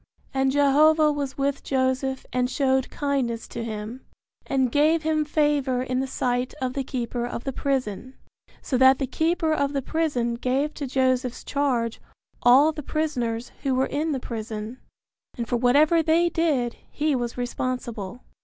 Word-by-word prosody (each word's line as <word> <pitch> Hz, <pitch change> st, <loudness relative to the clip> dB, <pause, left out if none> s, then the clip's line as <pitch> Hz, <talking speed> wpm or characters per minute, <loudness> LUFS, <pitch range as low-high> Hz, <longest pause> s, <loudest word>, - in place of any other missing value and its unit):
And 265 Hz, 0 st, +2 dB
Jehovah 300 Hz, +2 st, +4 dB
was 280 Hz, -3 st, -4 dB
with 275 Hz, 0 st, -1 dB
Joseph 260 Hz, 0 st, -1 dB
and 250 Hz, 0 st, +1 dB
showed 265 Hz, -1 st, +1 dB
kindness 265 Hz, -5 st, -2 dB
to 235 Hz, -, -5 dB
him, 220 Hz, +3 st, -6 dB, 0.4 s
and 265 Hz, -3 st, +1 dB
gave 310 Hz, +3 st, +3 dB
him 310 Hz, -1 st, +1 dB
favor 290 Hz, -4 st, +1 dB
in 255 Hz, 0 st, -1 dB
the 265 Hz, -, -1 dB
sight 250 Hz, -1 st, -1 dB
of 255 Hz, -1 st, -2 dB
the 275 Hz, -, -2 dB
keeper 245 Hz, -2 st, -3 dB
of 240 Hz, 0 st, -4 dB
the 270 Hz, -, -3 dB
prison, 260 Hz, -2 st, -2 dB, 0.5 s
so 255 Hz, -, -1 dB
that 260 Hz, 0 st, +7 dB
the 275 Hz, -, -1 dB
keeper 320 Hz, +3 st, 0 dB
of 280 Hz, -2 st, 0 dB
the 275 Hz, -, 0 dB
prison 280 Hz, -7 st, 0 dB
gave 270 Hz, +5 st, 0 dB
to 285 Hz, -, -5 dB
Joseph's 255 Hz, -1 st, 0 dB
charge 250 Hz, -5 st, -1 dB, 0.4 s
all 270 Hz, +6 st, +6 dB
the 305 Hz, -1 st, -6 dB
prisoners 250 Hz, -7 st, -2 dB
who 270 Hz, -2 st, 0 dB
were 260 Hz, +1 st, +2 dB
in 310 Hz, +3 st, -2 dB
the 270 Hz, -, -1 dB
prison, 220 Hz, 0 st, -6 dB, 0.6 s
and 235 Hz, -1 st, -3 dB
for 245 Hz, -, 0 dB
whatever 290 Hz, +7 st, +4 dB
they 330 Hz, +2 st, +3 dB
did 300 Hz, -9 st, 0 dB
he 305 Hz, 0 st, 0 dB
was 240 Hz, -1 st, -3 dB
responsible. 245 Hz, -3 st, -4 dB
265 Hz, 165 wpm, -25 LUFS, 245-290 Hz, 0.6 s, that